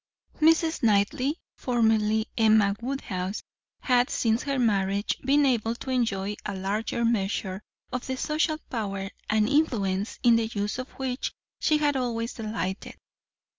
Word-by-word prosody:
Mrs. 320 +1 +3
Knightley, 230 - +2 0.2
formerly 220 -3 +2
Emma 215 -3 +4
Woodhouse, 205 -7 -3 0.4
had, 250 -1 +3
since 225 0 +1
her 275 -2 -2
marriage, 200 -4 +1
been 285 +2 +4
able 230 -3 +1
to 260 - -6
enjoy 210 -5 0
a 200 - -4
larger 210 +5 -1
measure 195 -3 -1 0.3
of 250 - -3
the 260 0 -2
social 310 +2 0
power 195 -5 -3 0.2
and 215 0 +3
influence 215 -9 +1
in 235 -1 +6
the 225 -1 0
use 210 +1 -3
of 255 - -5
which 260 -1 -3 0.3
she 305 - +3
had 295 -1 +1
always 235 -2 -2
delighted. 210 -4 -4
225 Hz, 135 wpm, -27 LUFS, 205-255 Hz, 0.4 s, in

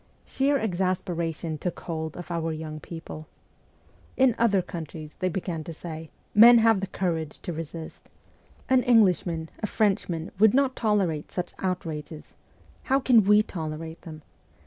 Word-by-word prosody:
Sheer 280 +1 +1
exasperation 175 - -2
took 180 - -4
hold 160 -2 -5
of 175 0 -8
our 165 -1 -1
young 155 -1 -6
people. 160 -1 -9 0.5
' - - -32
In 255 -3 +5
other 205 -5 +3
countries,' 155 -3 -8
they 185 - 0
began 175 -3 -4
to 165 -2 -7
say, 160 -1 -8
' - - -39
men 235 +3 +9
have 225 -2 +4
the 195 - -3
courage 165 -6 -2
to 175 - -4
resist. 160 0 -8 0.6
An 260 -1 +4
Englishman, 180 -9 +3
a 215 - -1
Frenchman, 185 -6 0
would 220 +2 +6
not 270 -1 +2
tolerate 195 -9 0
such 180 0 -4
outrages. 160 -4 -4 0.5
How 270 +1 +3
can 250 -4 +5
we 210 +1 +5
tolerate 160 -3 -6
them 155 -3 -10
175 Hz, 150 wpm, -26 LUFS, 160-210 Hz, 0.6 s, men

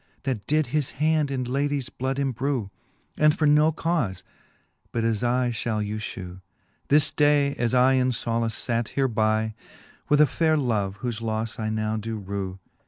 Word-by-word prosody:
That 125 -8 -3
did" 155 -1 +2
his 150 -3 +1
hand 155 0 +2
in 130 -2 -2
ladie's 140 +1 -1
bloud 130 +1 -3
embrew. 130 -5 -1 0.5
And 150 0 +4
for 155 - +1
no 150 +2 +5
caufe, 155 - -1 0.7
but 115 - -1
as 115 -1 0
I 125 0 +1
fhall 110 -2 -2
you 105 +1 -3
fhew. 95 -4 -7 0.5
This 145 +1 +4
day 145 -1 +3
as 120 +1 +1
I 130 +1 +5
in 130 -1 +2
folace 115 -2 -2
fate 115 -2 -1
hereby 110 -4 +1 0.6
With 150 - +4
a 150 - +8
fayre 160 +1 +1
love, 105 -7 -1
whofe 120 -2 -3
lofTe 110 0 -3
I 110 -1 -1
now 110 0 -1
do 110 +1 -4
rew. 95 -2 -5
120 Hz, 170 wpm, -25 LUFS, 110-145 Hz, 0.7 s, a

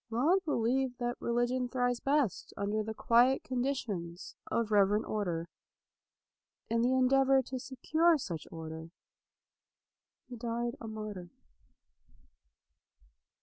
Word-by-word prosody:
Laud 305 +12 +2
believed 255 -2 0
that 240 0 -2
religion 245 +1 0
thrives 245 -1 0
best 280 -6 0
under 205 +2 -1
the 220 +1 -4
quiet 240 +4 +3
conditions 240 -10 -3
of 230 -2 -1
reverent 205 +1 +4
order. 175 -6 -2 1.2
In 230 0 +2
the 250 +2 +3
en 255 -1 +4
deavor 270 0 +4
to 260 0 -5
secure 315 +7 +2
such 170 - -5
order 160 0 -7 1.4
he 245 - -8
died 235 +1 -2
a 225 - -6
martyr. 215 -5 -6
240 Hz, 110 wpm, -32 LUFS, 210-260 Hz, 1.4 s, reverent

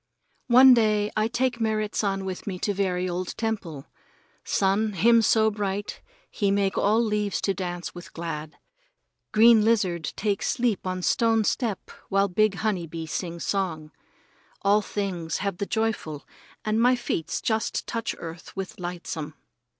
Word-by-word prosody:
One 255 +1 +8
day 215 -3 +2
I 215 0 +2
take 240 0 -1
Merrit 215 -1 0
San 195 -2 -1
with 185 +1 -6
me 190 -2 -3
to 205 +3 -1
very 185 -2 0
old 180 0 -4
temple. 195 -11 -3 0.6
Sun, 205 +2 +1
him 230 +6 +5
so 220 0 +3
bright 205 -1 -3 0.3
he 200 -3 0
make 195 -1 +1
all 215 +3 +3
leaves 210 -2 0
to 195 - +1
dance 175 -2 -5
with 175 0 -10
glad. 160 -2 -6 0.7
Green 225 0 +6
lizard 190 -8 +1
take 205 -2 -1
sleep 235 -6 0
on 185 0 -3
stone 225 +1 +3
step 215 -1 -2 0.2
while 195 +1 +3
big 215 +2 +2
honey 195 -5 -1
bee 165 0 -6
sing 170 +1 -4
song. 165 -6 -2 0.7
All 205 +2 +4
things 185 -6 -3
have 200 -2 -3
the 200 - -3
joyful, 220 -10 -2 0.4
and 215 +1 +1
my 250 +2 +5
feets 235 -9 -3
just 220 -1 -1
touch 230 -1 -3
earth 165 0 -9
with 190 -4 -6
lightsome. 170 -3 -5
200 Hz, 150 wpm, -26 LUFS, 180-220 Hz, 0.7 s, One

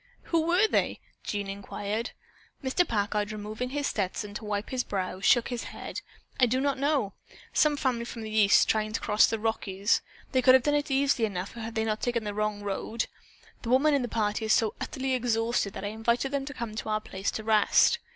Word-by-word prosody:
"Who 325 -1 +3
were 365 +5 +4
they?" - - 0 0.2
Jean 205 -1 -3
inquired. 200 +3 -4 0.5
Mr. 275 +7 +2
Packard, 205 0 0
removing 215 +4 -4
his 285 +1 -2
Stetson 205 -2 -2
to 215 - -6
wipe 210 0 -3
his 255 -1 0
brow, 185 -2 -3
shook 235 +3 +4
his 245 -2 -4
head. - - -7 0.4
"I 250 - +6
do 255 +3 +1
not 275 0 0
know. 280 -8 +1 0.4
Some 300 -1 +3
family 245 -4 0
from 230 -1 -7
the 215 - -6
East 205 -2 +5
trying 215 -1 0
to - - 0
cross 210 +1 +4
the 225 - -1
Rockies. 210 -2 0 0.3
They 260 - +3
could 255 0 +7
have 260 - +4
done 295 - +2
it 290 0 0
easily 270 -4 +2
enough 190 0 -5
if 225 -1 -6
they 220 - +1
had 220 - -1
not 215 0 -1
taken 240 -2 0
the 205 -1 -3
wrong 210 0 -1
road. 205 +3 -2 0.6
The 230 - -5
woman 275 +5 +4
in 280 - +3
the 245 - -2
party 215 -1 -1
is 220 - +3
so 225 -4 +2
utterly 265 0 -2
exhausted 230 -4 0
that 200 - -6
I - - -1
invited 235 +5 0
them 280 -1 -1
to 285 - -6
come 235 -3 -5
to 220 - -4
our 215 0 +1
place 195 -2 -4
to 220 - -4
rest. 220 - +4
225 Hz, 220 wpm, -28 LUFS, 210-260 Hz, 0.6 s, could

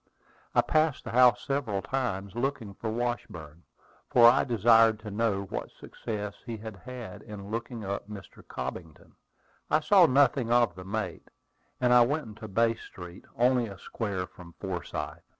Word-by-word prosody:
I - - +6
passed 155 -2 +1
the 115 - -6
house 125 +1 +5
several 125 -9 -1
times, 100 -8 -2
looking 120 -4 -3
for 110 +3 -5
Washburn, 100 -10 -4 0.5
for 120 -1 +7
I 125 +3 +5
desired 115 -2 +4
to 105 -1 -7
know 105 -2 0
what 95 - -5
success 105 -2 -5
he 115 -1 -5
had 110 0 -8
had 115 0 -9
in 100 -1 -9
looking 115 -1 -4
up 100 +1 -4
Mr. 100 -3 -10
Cobbington. 80 -4 -7 0.6
I 155 - +4
saw 185 +1 +6
nothing 135 -3 +3
of 120 -5 +4
the 90 +1 -10
mate, 100 -3 -4 0.5
and 125 -1 +3
I 125 -1 +8
went 145 +5 -1
into 110 0 -9
Bay 115 +3 +2
Street, 90 -5 -11
only 125 0 +3
a 100 -2 -9
square 100 -2 -4
from 90 -2 -14
Forsyth. 95 -3 -5
115 Hz, 160 wpm, -28 LUFS, 100-125 Hz, 0.6 s, I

